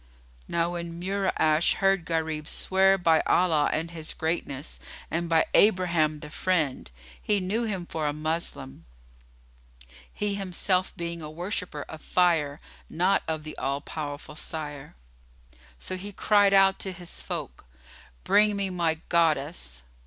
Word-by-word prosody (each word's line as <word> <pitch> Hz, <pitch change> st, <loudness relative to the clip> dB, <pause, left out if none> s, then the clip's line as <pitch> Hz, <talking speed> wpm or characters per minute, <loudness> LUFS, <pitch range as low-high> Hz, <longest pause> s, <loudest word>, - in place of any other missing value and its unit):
Now 170 Hz, 0 st, 0 dB
when 170 Hz, -1 st, -5 dB
Mura'ash 180 Hz, -4 st, +2 dB
heard 195 Hz, -3 st, +2 dB
Gharib 160 Hz, -2 st, -2 dB
swear 195 Hz, +1 st, +3 dB
by 165 Hz, -3 st, +4 dB
Allah 160 Hz, -5 st, +3 dB
and 165 Hz, +2 st, -2 dB
His 160 Hz, -2 st, -6 dB
greatness 160 Hz, -3 st, -2 dB, 0.3 s
and 170 Hz, +1 st, -1 dB
by 160 Hz, -1 st, +4 dB
Abraham 170 Hz, -7 st, +3 dB
the 150 Hz, -, -9 dB
Friend, 155 Hz, -, 0 dB, 0.3 s
he 210 Hz, -1 st, +1 dB
knew 205 Hz, +6 st, -1 dB
him 195 Hz, -5 st, -3 dB
for 160 Hz, -3 st, -2 dB
a -, -, +1 dB
Moslem 155 Hz, -, -3 dB, 1.2 s
(he 210 Hz, -1 st, -2 dB
himself 185 Hz, -1 st, 0 dB
being 170 Hz, 0 st, -4 dB
a 150 Hz, -, -6 dB
worshipper 175 Hz, -2 st, -4 dB
of 160 Hz, -, -9 dB
Fire, 165 Hz, -5 st, +2 dB, 0.3 s
not 180 Hz, +4 st, +2 dB
of 160 Hz, -1 st, -2 dB
the 155 Hz, 0 st, -7 dB
All 140 Hz, +1 st, -1 dB
powerful 145 Hz, -1 st, -6 dB
Sire), 150 Hz, -3 st, -5 dB, 0.8 s
so 185 Hz, -, -5 dB
he 195 Hz, +3 st, -7 dB
cried 205 Hz, 0 st, +4 dB
out 195 Hz, 0 st, +5 dB
to 190 Hz, -, -4 dB
his 180 Hz, -2 st, -7 dB
folk, -, -, -6 dB, 0.6 s
"Bring 210 Hz, 0 st, +4 dB
me 200 Hz, -1 st, -1 dB
my 165 Hz, -3 st, 0 dB
Goddess. 150 Hz, -, 0 dB
170 Hz, 140 wpm, -27 LUFS, 155-185 Hz, 1.2 s, out